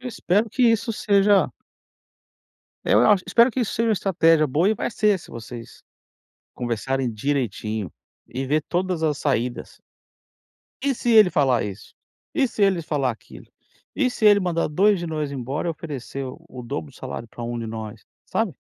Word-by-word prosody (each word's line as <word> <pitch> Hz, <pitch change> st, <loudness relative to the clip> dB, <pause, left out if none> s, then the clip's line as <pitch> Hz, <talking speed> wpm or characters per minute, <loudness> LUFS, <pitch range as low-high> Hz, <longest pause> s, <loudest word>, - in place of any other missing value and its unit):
Espero 220 Hz, -3 st, 0 dB
que 255 Hz, -, 0 dB
isso 230 Hz, -1 st, +3 dB
seja 200 Hz, -, +3 dB, 1.3 s
eu 105 Hz, -, +4 dB
acho 195 Hz, -3 st, +4 dB
espero 235 Hz, +2 st, +5 dB
que 255 Hz, -, -2 dB
isso 230 Hz, -, -1 dB
seja 230 Hz, 0 st, +1 dB
uma -, -, +4 dB
estratégia 165 Hz, -5 st, +3 dB
boa, 160 Hz, +9 st, +2 dB
e 220 Hz, -, +2 dB
vai -, -, -3 dB
ser, 210 Hz, -3 st, +2 dB
se -, -, -15 dB
vocês 115 Hz, 0 st, -10 dB, 0.7 s
conversarem 125 Hz, +2 st, -2 dB
direitinho 110 Hz, -4 st, -2 dB, 0.4 s
e 130 Hz, +2 st, -4 dB
ver 150 Hz, +3 st, +1 dB
todas 180 Hz, -2 st, -1 dB
as 150 Hz, -3 st, +1 dB
saídas 125 Hz, -3 st, -2 dB, 1.1 s
"e 275 Hz, -2 st, +2 dB
se 240 Hz, -, 0 dB
ele 215 Hz, -5 st, +7 dB
falar 135 Hz, -7 st, +2 dB
isso? 100 Hz, 0 st, -8 dB, 0.4 s
E 270 Hz, -5 st, +2 dB
se 215 Hz, -, -8 dB
eles 190 Hz, -5 st, +3 dB
falar 140 Hz, -5 st, 0 dB
aquilo? 110 Hz, -, -14 dB, 0.5 s
E 255 Hz, -3 st, +1 dB
se 220 Hz, -, -4 dB
ele 205 Hz, -1 st, +7 dB
mandar 175 Hz, -2 st, 0 dB
2 195 Hz, +5 st, +3 dB
de 170 Hz, -, -4 dB
nós 155 Hz, -3 st, -3 dB
embora 140 Hz, +5 st, -3 dB
e -, -, +1 dB
oferecer 140 Hz, -4 st, -6 dB
o 125 Hz, 0 st, -10 dB
dobro 80 Hz, -10 st, -5 dB
do -, -, -18 dB
salário 115 Hz, -, -7 dB
pra 120 Hz, +1 st, -8 dB
1 120 Hz, 0 st, -4 dB
de 115 Hz, -1 st, -4 dB
nós?", 110 Hz, -1 st, -7 dB, 0.2 s
sabe? -, -, -1 dB
155 Hz, 175 wpm, -23 LUFS, 125-205 Hz, 1.3 s, ele